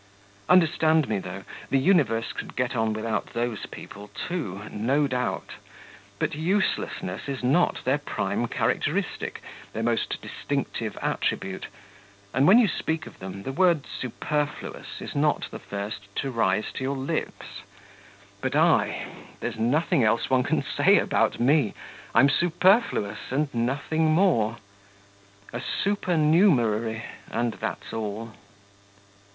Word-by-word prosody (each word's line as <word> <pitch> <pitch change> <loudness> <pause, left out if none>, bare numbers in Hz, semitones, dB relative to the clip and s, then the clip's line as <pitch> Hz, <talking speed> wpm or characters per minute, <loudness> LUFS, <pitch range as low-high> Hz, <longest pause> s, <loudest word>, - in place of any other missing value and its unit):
Understand 160 -3 +4
me, 105 -2 0
though: 95 +1 -7 0.3
the 135 - +3
universe 130 - +2
could - - -7
get 125 0 -1
on 110 -1 +1
without 110 0 -2
those 120 -2 -2
people 105 0 -10
too... 105 - -4
no 135 +8 +1
doubt; 125 -2 -2 0.7
but - - -1
uselessness 160 - -1
is 135 -2 -4
not 145 +8 +2
their 135 +3 +2
prime 145 - -2
characteristic, - - -1 0.3
their 110 - -2
most 115 0 0
distinctive - - -3
attribute, 95 -1 -1 0.7
and 135 +4 +4
when 200 - +8
you 240 -3 +6
speak 160 -3 -2
of - - -12
them, 95 +1 -7
the 135 - -3
word 170 -1 +3
'superfluous' 150 +4 -4
is - - -6
not 150 +1 +1
the - - -7
first 100 0 -6
to 135 - -1
rise 105 -3 +1
to - - -4
your 135 +1 -1
lips. 140 +5 -4 0.8
But - - -1
I... - - +3 0.3
there's - - -4
nothing 130 +3 +2
else 115 +4 +2
one 130 -1 +5
can - - 0
say - - +4
about - - +1
me; 135 -2 +3 0.4
I'm 125 +4 +7
superfluous 175 - +2
and 140 +2 0
nothing 140 +7 0
more. 155 - +3 1.0
A 120 - -3
supernumerary, 150 - +2 0.3
and 120 -1 -1
that's - - -5
all. 110 +1 -4
130 Hz, 130 wpm, -26 LUFS, 110-155 Hz, 1.0 s, when